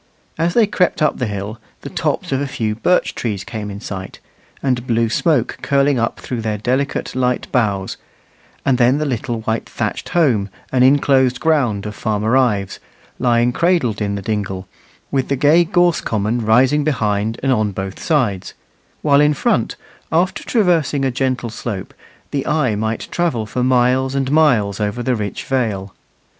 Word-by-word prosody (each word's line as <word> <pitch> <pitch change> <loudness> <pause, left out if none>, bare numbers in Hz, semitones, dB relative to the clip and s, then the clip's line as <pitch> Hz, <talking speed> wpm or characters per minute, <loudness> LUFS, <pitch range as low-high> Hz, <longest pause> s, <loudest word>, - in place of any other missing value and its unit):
As 165 +2 0
they 230 - +6
crept 185 -3 +1
up 150 - +1
the 125 - 0
hill 105 +2 -5 0.2
the - - -7
tops - - -2
of 135 0 0
a 145 - -1
few 110 -5 -2
birch 180 +12 +1
trees 105 -5 -3
came 105 0 -6
in 100 0 -7
sight, 95 -2 -7 0.5
and 125 -2 0
blue 115 -1 +1
smoke 145 -1 +1
curling 140 -1 +2
up 115 - -1
through 120 -3 -4
their 110 -1 -2
delicate 130 +6 -1
light 125 -1 0
boughs; 100 -6 0 0.7
and 135 -2 +2
then 125 +3 +4
the 155 - -1
little 120 -3 -2
white 110 +1 -2
thatched - - -3
home 130 - +2 0.2
and 125 -1 +3
inclosed 130 -2 +3
ground 125 -11 +1
of 105 - -4
Farmer 110 +3 0
Ives, 105 -7 +1 0.4
lying 120 -1 +3
cradled 165 - +1
in 100 -1 -1
the 100 - -5
dingle, 95 -3 -3 0.4
with 135 -2 0
the 140 - 0
gay 150 +6 +5
gorse 175 -1 +2
common 110 +2 -1
rising 130 +7 +4
behind 110 -6 0
and 135 - +2
on 110 -4 +1
both 95 0 -6
sides; 120 - 0 0.5
while 145 -1 +5
in 150 0 +3
front, - - 0 0.4
after 175 +4 +1
traversing 165 - +1
a 130 - +1
gentle 125 -2 -1
slope, 105 -4 -5 0.4
the 140 -2 -2
eye 150 -7 +1
might 110 +2 -2
travel 160 -11 0
for 120 +4 -3
miles 130 +1 +2
and 135 -1 0
miles 120 -11 +3
over 105 +3 -2
the 130 -1 +1
rich 105 -4 -4
vale. 105 -7 -2
125 Hz, 170 wpm, -18 LUFS, 105-140 Hz, 0.7 s, they